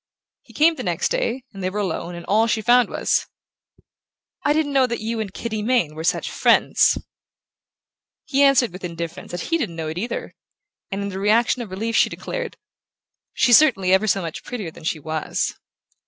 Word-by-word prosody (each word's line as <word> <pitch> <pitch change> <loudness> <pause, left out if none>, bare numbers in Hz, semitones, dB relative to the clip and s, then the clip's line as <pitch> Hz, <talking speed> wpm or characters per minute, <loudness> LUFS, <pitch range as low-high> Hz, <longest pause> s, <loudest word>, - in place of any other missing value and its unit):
He - - -19
came 320 +3 +4
the - - -4
next - - 0
day, - - -1
and 195 - -8
they 185 - -1
were 195 - -6
alone, 175 -2 -3
and 170 - -9
all 220 +3 +3
she 220 -1 0
found 245 0 +4
was: - - 0 1.2
"I - - +2
didn't 300 -1 +1
know 265 -2 +4
that 235 -1 -3
you 225 +1 -3
and 210 -3 -3
Kitty 220 +1 -4
Mayne 215 -9 +1
were 160 +1 -6
such 170 - 0
friends." - - +3 1.3
He 280 -2 +1
answered 265 -7 +4
with 185 - -10
indifference 170 -1 -6
that 175 -1 -5
he 330 - +3
didn't 170 - -3
know 160 -1 -4
it 160 +3 -4
either, 235 +4 -4 0.6
and 195 +1 -3
in 200 - -3
the 190 -1 -5
reaction 230 +5 +2
of 225 - -6
relief 220 +5 -3
she - - +4
declared: - - -5 0.8
"She's 240 -2 +6
certainly 195 -12 +3
ever 195 +3 +3
so 195 -2 +1
much 165 -2 -6
prettier 210 -9 -5
than 155 - -13
she 165 - 0
was..." 155 +1 -2
215 Hz, 195 wpm, -22 LUFS, 180-250 Hz, 1.3 s, She's